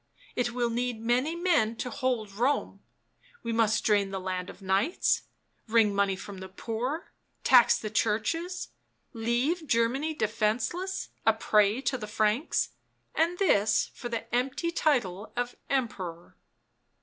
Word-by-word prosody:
It 240 -1 0
will 240 -1 0
need 240 -1 -1
many 250 +8 +1
men 330 -11 +2
to 250 +2 -4
hold 245 -5 -1
Rome; 245 +8 0 0.6
we 230 - -2
must 220 -1 +2
drain 205 -2 +3
the 195 0 -3
land 185 0 -3
of - - -11
knights, 195 - +1 0.5
wring 220 -2 +4
money 200 -1 +2
from 195 0 -9
the 190 0 -8
poor, 240 - -4 0.3
tax 245 -2 +6
the 215 - -5
churches 325 - -1 0.2
— - - -46 0.2
leave 245 +9 0
Germany 265 +7 +1
defenceless, 235 - -1
a - - +5
prey 210 +3 +3
to 265 -2 -1
the 210 - -5
Franks, 215 +6 +1 0.4
and 340 +2 +1
this 215 - +3
for 240 - -6
the 230 -1 -3
empty 270 +7 0
title 230 - 0
of 245 0 -2
Emperor." 185 -10 -3
230 Hz, 140 wpm, -28 LUFS, 210-270 Hz, 0.6 s, tax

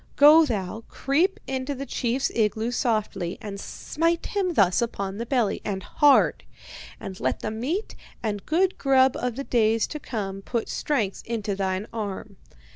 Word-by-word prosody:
Go 305 +3 +8
thou, 220 -2 -3
creep 325 +8 +1
into 265 +1 -3
the 275 +1 -5
chief's 260 +1 -1
igloo 220 +1 0
softly, 215 -8 -1
and 200 -2 -7
smite 330 +10 -1
him 375 -4 -1
thus 190 -3 +4
upon 200 -4 -3
the 235 +1 -4
belly, 240 -6 +1
and 195 -2 -3
hard. 290 -2 +4 0.6
And 190 -1 -7
let - - -1
the 215 - -3
meat 280 - -3 0.3
and 205 -3 -2
good 365 +4 +2
grub 265 -1 +4
of 245 -2 -2
the 275 - -4
days 225 -3 +2
to 300 - -6
come 195 -7 -4
put 230 +3 -3
strength 220 -10 -1
into 220 -3 -2
thine 190 0 -1
arm. 205 -2 -5
230 Hz, 160 wpm, -25 LUFS, 205-275 Hz, 0.6 s, Go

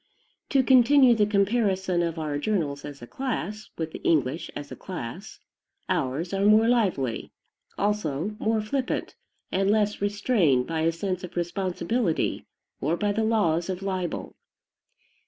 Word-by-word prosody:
To 270 -2 +3
continue 260 0 +6
the 210 -3 +2
comparison 195 -3 +1
of 170 -1 -2
our 150 -2 -2
journals 150 -7 -1
as 140 -3 -9
a - - -6
class, 215 - -4
with 160 -1 -3
the - - -8
English 155 +1 +1
as 145 0 -7
a - - -5
class, 120 -11 -7 0.5
ours 145 +8 -1
are 195 0 0
more 215 +2 +6
lively, 190 - 0 0.5
also 205 -2 -1
more 220 0 +1
flippant, 255 +4 -2 0.4
and 195 +1 +1
less 210 -1 +1
restrained 205 - +2
by 165 +2 -2
a 165 +1 +3
sense 185 +2 -3
of 180 - -8
responsibility 185 +3 -1 0.3
or 160 +5 0
by 205 +1 0
the 220 +2 0
laws 185 -6 +1
of 185 +1 -3
libel. 185 -3 -3
190 Hz, 145 wpm, -26 LUFS, 160-215 Hz, 0.5 s, continue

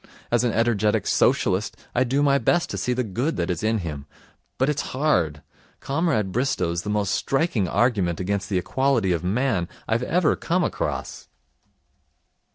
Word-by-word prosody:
As 120 0 +3
an 120 - +2
energetic 110 -2 +1
Socialist, 95 +4 +1 0.2
I 125 - +3
do 135 +3 +1
my 140 -1 +4
best 175 +3 +1
to - - -3
see 125 - -1
the 125 +1 0
good 120 - -2
that 85 +1 -1
is 90 - -3
in 110 +1 +1
him, 75 -3 -6 0.5
but 130 - +2
it's 150 -1 0 0.2
hard. 85 - +1 0.4
Comrade 135 - 0
Bristow's 90 -8 0
the 105 - -6
most 105 -2 0
striking 135 - 0
argument 95 -5 +1
against 100 +1 -2
the 95 - +1
equality 120 +1 +1
of 85 -1 -1
man 100 -2 0 0.2
I've 115 +2 +1
ever 165 +5 +2
come 180 +2 0
across.' - - -3
115 Hz, 165 wpm, -24 LUFS, 95-135 Hz, 0.5 s, my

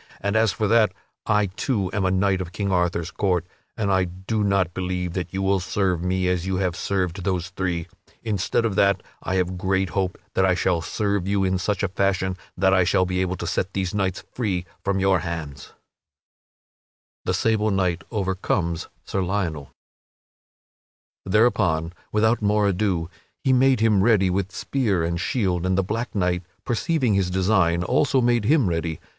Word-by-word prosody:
And 100 +2 -1
as 110 -1 +4
for 110 - -1
that, 110 -3 +4 0.3
I 105 -1 +3
too 95 0 -2
am 100 -2 0
a - - +3
knight 95 0 +1
of 90 -2 -6
King 100 -1 -2
Arthur's 90 -1 0
court, 90 -5 0 0.3
but 110 -3 -1
I 95 -1 +3
do 95 +5 -3
not 100 -3 +1
believe 90 -1 -3
that 90 -2 -3
you 95 0 -2
will 95 0 +2
serve 90 -2 0
me 90 +1 0
as 90 0 0
you 95 - 0
have 90 -2 0
served 95 -2 -2
those 90 -2 -1
three. 90 -3 -2 0.4
Instead 105 +1 0
of 110 - 0
that, 100 -1 +2 0.2
I 95 - -2
have 90 -1 -1
great 95 0 +1
hope 95 -1 -1 0.2
that 95 - +2
I 95 -1 +3
shall 90 -1 +1
serve 100 +3 -1
you 100 0 +1
in 95 -1 +1
such 100 +1 -1
a - - +3
fashion 95 0 0 0.2
that 95 +1 +3
I 95 -1 +5
shall 90 +1 +2
be 90 0 -1
able 95 0 -1
to - - -6
set 95 - -2
these 95 0 -2
knights 95 -3 -1
free 95 -7 -1 0.2
from 100 0 0
your 95 -1 +3
hands." 80 -5 -5
[Sidenote: - - -20 1.5
The - - +1
sable 110 -1 +1
knight 90 -4 0
overcomes 95 -4 -1 0.2
Sir 95 - -1
Lionel] 90 -7 -2 1.6
Thereupon, 95 -6 +2 0.2
without 110 +2 +2
more 105 0 +2
ado, 95 -4 0 0.4
he 130 -2 +3
made 130 -2 +4
him 110 -4 +4
ready 100 -5 +4
with 95 +1 -1
spear 100 -2 0
and 85 +1 -1
shield, 90 -6 0
and 95 0 +1
the 95 - +2
black 115 +6 -3
knight, 90 -2 +1 0.2
perceiving 130 0 +1
his 95 -2 +1
design, 90 -2 +2
also 130 - +2
made 120 -3 +2
him 140 -3 +4
ready. 80 -2 -2
95 Hz, 180 wpm, -23 LUFS, 90-105 Hz, 1.6 s, I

